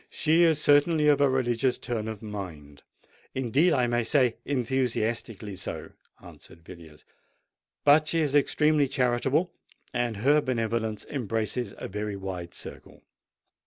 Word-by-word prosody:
"She 160 +2 +2
is 160 -3 +4
certainly 150 +1 +4
of 145 -1 +3
a 140 - +5
religious 125 -1 0
turn 110 -3 -4
of 110 -1 -7
mind—indeed, 105 - -3
I 130 -5 +2
may 120 0 0
say, 125 -1 +2
enthusiastically 115 -5 -2
so," - - -6 0.3
answered 80 - -15
Villiers. 80 -4 -14 0.8
"But 150 +2 +5
she 165 +1 +1
is 145 -3 0
extremely 150 0 +3
charitable—and 125 - -2
her 145 +8 +3
benevolence 115 -4 -2
embraces 115 -2 -3
a - - -6
very 105 +1 -4
wide 95 -3 -6
circle." - - -11
120 Hz, 125 wpm, -27 LUFS, 105-145 Hz, 0.8 s, a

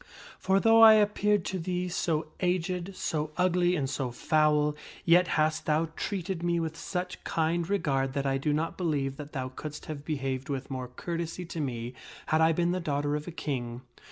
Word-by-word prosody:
For 190 +1 +3
though 225 +2 +6
I 220 -1 +11
appeared 210 -2 +3
to 190 - -2
thee 180 +1 -2
so 160 -3 -1
aged, 180 +1 -1
so 155 -3 -2
ugly, 180 0 +3
and 140 -5 0
so 130 -1 -2
foul, 150 +3 +2 0.3
yet 175 +1 +5
hast 155 0 +1
thou 155 +1 +2
treated 190 -3 -3
me 170 0 +1
with 160 -1 -3
such 180 +2 -4
kind 165 +1 0
regard 135 -9 0
that 140 0 -1
I 135 0 +1
do 150 +2 0
not 155 +4 -1
believe 140 -6 -1
that 145 0 -9
thou 130 -2 -3
couldst 150 +3 -8
have 150 -2 -6
behaved 135 -3 -3
with, 135 0 -4
more 130 -1 -4
courtesy 170 +6 -4
to 170 - -6
me 120 -4 -3 0.3
had 155 0 +2
I 160 0 +5
been 170 +2 +1
the 185 - 0
daughter 145 -3 -1
of 150 +2 -4
a - - -4
king. 125 -6 -4
160 Hz, 190 wpm, -29 LUFS, 140-180 Hz, 0.3 s, I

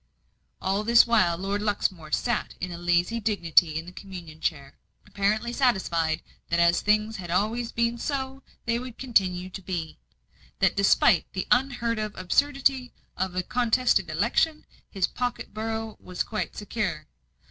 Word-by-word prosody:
All 195 +2 0
this 235 +2 +6
while, 210 -8 +3
Lord 195 +3 -2
Luxmore 190 -6 -1
sat 240 +7 -1
in 180 0 -4 0.2
lazy 175 +6 +2
dignity 175 -7 +3
in 160 - -4
the 180 - -9
communion 180 -5 -10
chair, 140 -4 -2 0.3
apparently 215 +4 0
satisfied 175 - +1 0.3
that 170 - +1
as 170 0 +4
things 215 0 +1
always 215 +7 0
had - - -12
been 235 0 +1
so 270 0 -3 0.2
they 235 0 +1
would 250 -2 -8
continue 185 -7 0
to 195 - -7
be; 170 -4 -5 0.6
that - - +2
despite 195 -3 +4
the 190 - -2
unheard 245 -3 +2
of 215 -1 -3
absurdity 270 +5 +1 0.2
of 185 -1 -2
a 185 - 0
contested 240 -4 +2
election, 235 - +1 0.2
his 190 -3 +1
pocket 245 0 -4
borough 220 0 -4
was 180 -1 -3
quite 215 - -4
secure. 195 -7 -3
210 Hz, 145 wpm, -26 LUFS, 180-235 Hz, 0.6 s, this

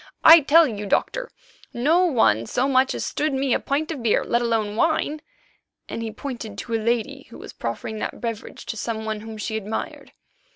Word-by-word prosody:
I 330 +1 +10
tell 320 +3 +5
you, 210 -6 -4
Doctor, - - 0 0.5
no 320 +9 +3
one 115 - +2
so 255 - 0
much 265 -1 +2
as - - -3
stood 300 -2 -1
me 265 -2 +1
a - - +2
pint 300 +4 -2
of 290 -6 -5
beer, 230 -2 +2
let 235 - 0
alone 225 -3 0
wine," 310 +2 0 0.7
and - - -5
he 225 - -3
pointed 230 -4 -7
to 230 - -6
a 225 - 0
lady 240 +5 -1
who - - -11
was - - -10
proffering 120 - -5
that - - -4
beverage 230 -2 -6
to - - -5
some 220 0 -4
one 215 -1 -3
whom 220 0 -9
she 220 +1 -4
admired. 215 +1 -6
235 Hz, 200 wpm, -23 LUFS, 220-280 Hz, 0.7 s, I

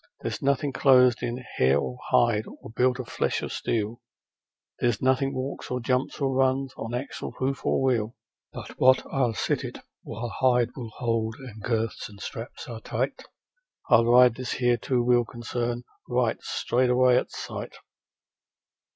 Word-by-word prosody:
There's - - -4
nothing 140 0 +1
clothed 125 -3 +5
in 120 0 -2 0.2
hair 65 +2 +4
or 65 -3 -4
hide, 115 -2 +3
or - - -11
built 125 +2 +2
of 130 -3 -6
flesh - - -1
or - - -3
steel, 115 +2 -2 0.8
There's 120 -4 +1
nothing 130 +1 +2
walks 130 +1 -5
or 125 - -1
jumps, 125 +2 -1
or 135 -2 0
runs, 130 0 +1
on 115 +2 -5
axle, 130 +3 -5
hoof, 135 +1 -2
or - - +1
wheel, 115 -4 +1 0.4
But - - -9
what 130 0 +5
I'll 125 -5 +1
sit, - - -2 0.2
while 115 +3 -5
hide 125 -2 +3
will 120 -4 -6
hold 115 -2 -1
and 120 -5 -10
girths 115 0 -2
and 100 -1 -14
straps 120 +9 -7
are 115 -3 -7
tight: - - -3 0.7
I'll 115 -1 +6
ride 125 0 +6
this 130 +1 -4
here 120 -1 +2
two 120 +1 0
wheeled 120 -1 +3
concern 120 0 -3 0.3
right 125 -2 +1
straight 125 +1 0
away 125 0 +5
at - - 0
sight.' - - -7
125 Hz, 160 wpm, -26 LUFS, 115-130 Hz, 0.8 s, I'll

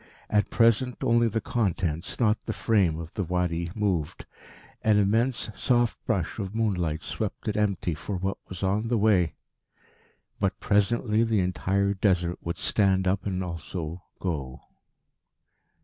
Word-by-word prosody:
At 105 -1 +2
present 120 +2 +3
only 120 -2 +4
the 110 0 0
contents, 90 -8 -1
not 110 -3 +2
the 110 - -1
frame, 100 -10 +2
of 85 0 -8
the 100 - -1
Wadi 85 -1 -1
moved. 95 -8 -1 0.6
An 110 -1 +4
immense 110 +4 +2
soft 120 -1 +1
brush 100 -6 -1
of 100 0 -4
moonlight 90 -8 0
swept - - -4
it 105 - 0
empty 100 -5 0
for 85 +6 -5
what 95 +2 -2
was 95 +1 -6
on 100 +4 +1
the 120 0 +1
way.... 100 -6 +3 1.0
But 95 -2 0
presently 105 +2 +2
the 110 -3 +2
entire 95 +2 0
Desert 90 -3 +1
would 85 +1 -4
stand 95 -2 +2
up 95 +2 0
and 95 -1 -1
also 85 0 -5 0.2
go. 70 -8 -4
100 Hz, 145 wpm, -27 LUFS, 90-110 Hz, 1.0 s, only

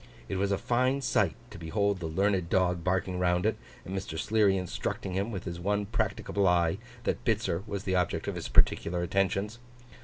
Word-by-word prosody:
It 95 - -2
was 100 +1 +1
a 100 - +2
fine 130 +5 +1
sight, 125 - +2 0.2
to - - -9
behold 100 +4 0
the 85 - -3
learned 95 +1 +1
dog 90 -2 +2
barking 90 0 0
round 90 0 +2
it, 110 - +2 0.3
and 95 +3 -5
Mr. 95 -4 -4
Sleary 105 +1 +3
instructing 90 +1 -3
him, 100 +5 -1
with 95 -4 -4
his 85 -2 -5
one 105 +3 0
practicable 100 -2 0
eye, 85 +1 +3 0.2
that - - -1
Bitzer 110 -7 0
was 100 -2 -4
the 95 - -1
object 90 -2 0
of - - -1
his - - -5
particular 85 +1 +3
attentions. 100 +4 0
95 Hz, 190 wpm, -29 LUFS, 90-105 Hz, 0.3 s, Sleary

